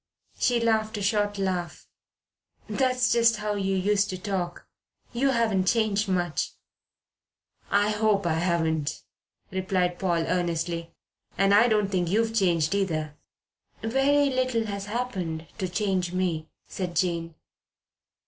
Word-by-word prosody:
She 245 -2 +2
laughed 220 -1 +1
a - - -4
short 205 0 +1
laugh. 180 -4 -3 0.8
"That's 255 -2 +1
just 230 -1 +4
how 210 0 -2
you 195 -1 -1
used 205 +2 +2
to 185 - -3
talk. 180 -2 -3 0.5
You 265 +3 +2
haven't 220 -7 +1
changed 215 -2 +2
much." 175 -3 -1 1.2
"I 205 +1 +3
hope 210 -2 +1
I 170 - +2
haven't," 160 -3 0 0.5
replied 185 -1 0
Paul 170 -3 +1
earnestly. 170 -1 -1 0.5
"And 195 +2 +4
I 215 +4 +6
don't 210 -3 +1
think 180 -3 0
you've 225 +3 +1
changed 175 -6 +2
either." 160 -7 -1 0.7
"Very 275 +4 +3
little 255 -3 0
has 200 -2 -4
happened 190 -9 -3
to 185 - -2
change 185 -2 -1
me," 175 -4 -1 0.2
said 180 -2 -5
Jane. 170 -2 -1
195 Hz, 130 wpm, -26 LUFS, 175-220 Hz, 1.2 s, I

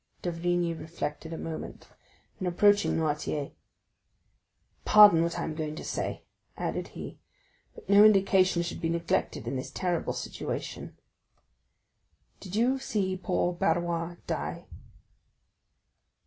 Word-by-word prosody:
D'Avrigny 175 0 0
reflected 160 -1 -6
a 165 - -4
moment; 160 -1 -7 0.5
then 185 - -2
approaching 205 +3 +3
Noirtier: 150 -2 -2 1.3
"Pardon 205 -6 +8
what 170 0 -1
I - - -2
am 160 - -3
going 155 -1 -4
to - - -7
say," - - -4 0.3
added - - -3
he, - - -8 0.6
"but - - -14
no 200 +1 +7
indication 195 -4 +4
should 170 - -5
be 165 - 0
neglected 170 0 -1
in 135 - -2
this 130 - -5
terrible 175 -2 -2
situation. - - -5 1.4
Did 190 0 -8
you 250 +4 +2
see 200 -7 -1
poor 180 -1 -1
Barrois 170 0 -1
die?" - - -4
175 Hz, 120 wpm, -28 LUFS, 165-190 Hz, 1.4 s, Pardon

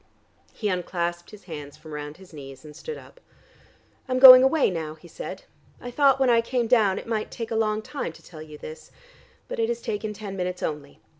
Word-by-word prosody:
He 215 - -4
unclasped 175 -2 -3
his 210 -1 -14
hands 150 -5 -9
from 155 0 -12
round 150 0 -7
his 185 -2 -16
knees, 135 -2 -11
and 150 -1 -12
stood 465 - -7
up. - - -15 0.9
"I'm 255 - +1
going 255 -1 +11
away 265 -2 +3
now," 160 -3 -5
he 160 +2 -16
said. - - -8 0.4
"I 245 - -8
thought 275 0 +3
when 265 - +3
I 235 -1 +4
came 240 +1 -1
down 220 -5 +3
it - - -6
might 220 -2 -2
take 230 0 -7
a - - -1
long 215 -1 0
time 280 - -5
to - - -17
tell 155 -3 -12
you 155 -1 -11
this. 155 +1 -10 0.6
But - - -6
it 455 0 +1
has 475 0 -2
taken 210 - -4
ten 205 -1 -7
minutes 180 -1 -4
only. 150 -2 -5
195 Hz, 215 wpm, -25 LUFS, 155-245 Hz, 0.9 s, going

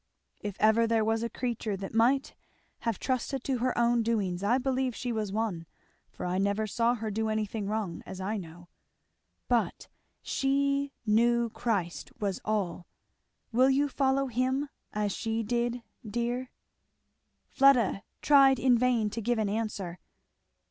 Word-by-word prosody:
If 205 -2 -5
ever 220 +2 +4
there 225 -1 +2
was 225 0 +1
a 235 - -2
creature 230 -4 -3
that 195 +2 -7
might 250 +5 +3 0.5
have 230 -4 -1
trusted 260 0 -2
to 260 -3 -1
her 255 +1 0
own 235 0 +3
doings, 205 -6 0
I 230 +5 +3
believe 260 -2 -1
she 245 - -3
was 215 -3 -2
one, 200 -6 -2 0.4
for - - -7
I 180 +1 0
never 200 +2 +1
saw 230 +3 +1
her 220 -2 -4
do 220 +2 -1
anything 215 -1 -2
wrong, 210 -5 -2
as 190 - -8
I 205 +4 -2
know. 175 -1 -10 0.8
But - - 0 0.3
she 280 +1 +1
knew 235 +2 +3
Christ 200 -9 -2
was 200 -3 -2
all. 190 -5 -2 0.6
Will 255 +3 +4
you 280 +2 +3
follow 275 0 +1
him 260 +3 0 0.2
as 210 -1 -1
she 225 +3 -2
did, 240 +1 -1 0.2
dear?" 240 +3 -2 1.0
Fleda 255 -8 +4 0.2
tried 275 -2 +6
in 250 -2 +4
vain 235 -4 +2
to 230 - -4
give 240 +2 0
an 215 -2 0
answer. 205 -5 -3
230 Hz, 150 wpm, -29 LUFS, 210-250 Hz, 1.0 s, tried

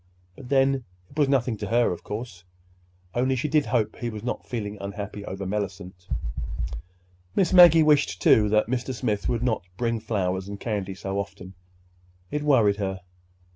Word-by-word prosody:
But 125 - -11
then, 135 -1 +3 0.3
it - - -16
was 145 -2 +4
nothing 125 -4 +1
to 105 - -4
her, 120 +3 +3
of 90 - -6
course—only 90 +2 -5
she 130 +4 -1
did 150 -1 +2
hope 110 -4 0
he 120 - -3
was 110 -2 -7
not 120 - -4
feeling 105 -4 -4
unhappy 100 +1 -6
over 95 0 -5
Mellicent! 95 -2 -5 1.3
Miss 190 -1 +2
Maggie 170 -3 +9
wished, 150 -1 +3
too, 105 -1 +5
that 105 0 +3
Mr. 125 +2 -2
Smith 110 -4 -1
would 120 -1 0
not 115 -4 +1 0.2
bring 115 -1 0
flowers 95 -4 -2
and 100 0 -7
candy 100 -4 -3
so 95 +1 -3
often. 95 -2 -7 0.8
It 150 - -1
worried 115 -9 +4
her. 95 -2 -3
105 Hz, 165 wpm, -25 LUFS, 95-125 Hz, 1.3 s, Maggie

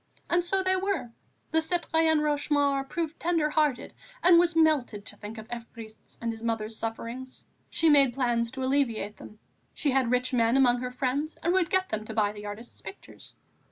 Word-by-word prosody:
And 345 0 +3
so 380 +2 0
they 375 0 +2
were; 375 -10 -2 0.4
the 320 0 +3
citoyenne 320 -2 +1
Rochemaure 285 -2 +1
proved 330 -2 -3
tender 325 -3 +1
hearted 300 -5 0 0.3
and 345 -1 +7
was 345 -1 +2
melted 290 -10 +2
to - - -8
think 215 +2 -9
of 220 0 -9
Évariste's 230 -2 -10
and 230 0 -2
his 225 0 -9
mother's 225 -1 -2
sufferings. 230 +4 -6 0.3
She 330 - +1
made 280 -5 +5
plans 240 -3 0
to 265 0 -4
alleviate 245 -6 0
them; 215 - -12 0.4
she 290 - 0
had 260 -2 +2
rich 250 +1 0
men 235 +1 +3
amongst 245 -2 +4
her 250 - -3
friends 270 +4 -2
and 345 - +2
would 370 -3 +2
get 375 0 +1
them 215 0 -2
to 220 - -7
buy 210 -2 +2
the 210 0 -8
artist's 215 +4 -9
pictures. 395 - -12
265 Hz, 190 wpm, -28 LUFS, 230-320 Hz, 0.4 s, and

